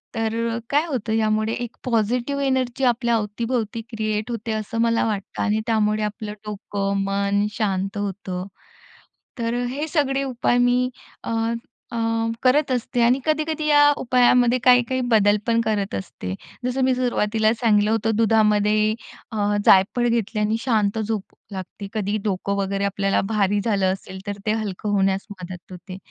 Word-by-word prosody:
तर 225 Hz, +1 st, -1 dB
काय 295 Hz, +3 st, +2 dB
होतं, 235 Hz, -7 st, -2 dB
यामुळे 215 Hz, 0 st, +1 dB
एक 240 Hz, 0 st, -5 dB
पॉझिटिव्ह 245 Hz, +4 st, 0 dB
एनर्जी 260 Hz, -1 st, 0 dB
आपल्या 240 Hz, -1 st, +2 dB
अवतीभोवती 225 Hz, +1 st, -2 dB
क्रिएट 215 Hz, 0 st, -2 dB
होते, 230 Hz, -1 st, -4 dB
असं 220 Hz, +1 st, -2 dB
मला 230 Hz, 0 st, +2 dB
वाटतं 205 Hz, -3 st, -4 dB
आणि 215 Hz, 0 st, +1 dB
त्यामुळे 215 Hz, -1 st, +1 dB
आपलं 210 Hz, 0 st, -4 dB
डोकं, 200 Hz, -1 st, -2 dB
मन 200 Hz, +1 st, +1 dB
शांत 195 Hz, -2 st, -1 dB
होतं, 190 Hz, -2 st, -4 dB, 0.9 s
तर 230 Hz, 0 st, -1 dB
हे 290 Hz, +5 st, -3 dB
सगळे 275 Hz, -3 st, +1 dB
उपाय 245 Hz, -2 st, 0 dB
मी 245 Hz, +1 st, +3 dB, 0.3 s
अ, -, -, -4 dB, 0.6 s
अ, -, -, -2 dB, 0.5 s
करत 270 Hz, +2 st, +3 dB
असते 245 Hz, 0 st, -1 dB
आणि 245 Hz, +3 st, +4 dB
कधी-कधी 310 Hz, 0 st, 0 dB
या 295 Hz, -1 st, +6 dB, 0.2 s
उपायामध्ये 250 Hz, 0 st, +4 dB
काही-काही 250 Hz, 0 st, +4 dB
बदल 205 Hz, -1 st, +5 dB
पण 230 Hz, 0 st, +3 dB
करत 210 Hz, -3 st, -1 dB
असते. 95 Hz, -1 st, -5 dB, 0.3 s
जसं 250 Hz, +1 st, -1 dB
मी 260 Hz, -, +3 dB
सुरुवातीला 220 Hz, -3 st, +1 dB
सांगितलं 210 Hz, -2 st, +3 dB
होतं 225 Hz, 0 st, +1 dB
दुधामध्ये 215 Hz, -1 st, +3 dB, 0.4 s
अ, 205 Hz, -1 st, 0 dB
जायफळ 200 Hz, +6 st, +5 dB
घेतल्याने 215 Hz, -1 st, 0 dB
शांत 220 Hz, -4 st, +1 dB
झोप 215 Hz, -2 st, -2 dB, 0.3 s
लागते, 190 Hz, +1 st, -7 dB
कधी 210 Hz, -1 st, -1 dB
डोकं 200 Hz, -1 st, -1 dB
वगैरे 195 Hz, 0 st, -1 dB
आपल्याला 195 Hz, 0 st, +1 dB
भारी 205 Hz, -1 st, +2 dB
झालं 195 Hz, -4 st, +2 dB
असेल, 190 Hz, 0 st, -9 dB
तर 205 Hz, 0 st, -3 dB
ते 215 Hz, -, +2 dB
हलकं 210 Hz, -2 st, -3 dB
होण्यास 195 Hz, -1 st, +1 dB
मदत 180 Hz, 0 st, -9 dB
होते. 185 Hz, +1 st, -9 dB
220 Hz, 145 wpm, -22 LUFS, 205-240 Hz, 0.9 s, या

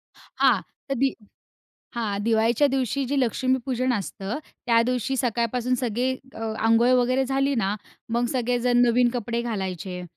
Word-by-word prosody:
हां, -, -, +1 dB, 0.3 s
तर -, -, +1 dB
दि 270 Hz, +2 st, +2 dB, 0.8 s
हां, 215 Hz, -4 st, -2 dB
दिवाळीच्या 225 Hz, +4 st, +3 dB
दिवशी 270 Hz, +1 st, 0 dB
जे 280 Hz, +2 st, -1 dB
लक्ष्मीपूजन 255 Hz, +1 st, 0 dB
असतं 200 Hz, +1 st, -3 dB, 0.3 s
त्या 230 Hz, -1 st, +5 dB
दिवशी 250 Hz, +2 st, -1 dB
सकाळपासून 245 Hz, 0 st, 0 dB
सगळे 245 Hz, 0 st, -1 dB, 0.2 s
अ, -, -, -9 dB, 0.3 s
अंघोळ 230 Hz, +2 st, +4 dB
वगैरे 255 Hz, +2 st, +1 dB
झाली 275 Hz, +1 st, +1 dB
ना 205 Hz, -4 st, 0 dB, 0.3 s
मग 235 Hz, +1 st, 0 dB
सगळेजण 245 Hz, -1 st, +1 dB
नवीन 240 Hz, +1 st, +4 dB
कपडे 235 Hz, 0 st, -2 dB
घालायचे. 190 Hz, -5 st, -4 dB
240 Hz, 135 wpm, -25 LUFS, 225-255 Hz, 0.8 s, त्या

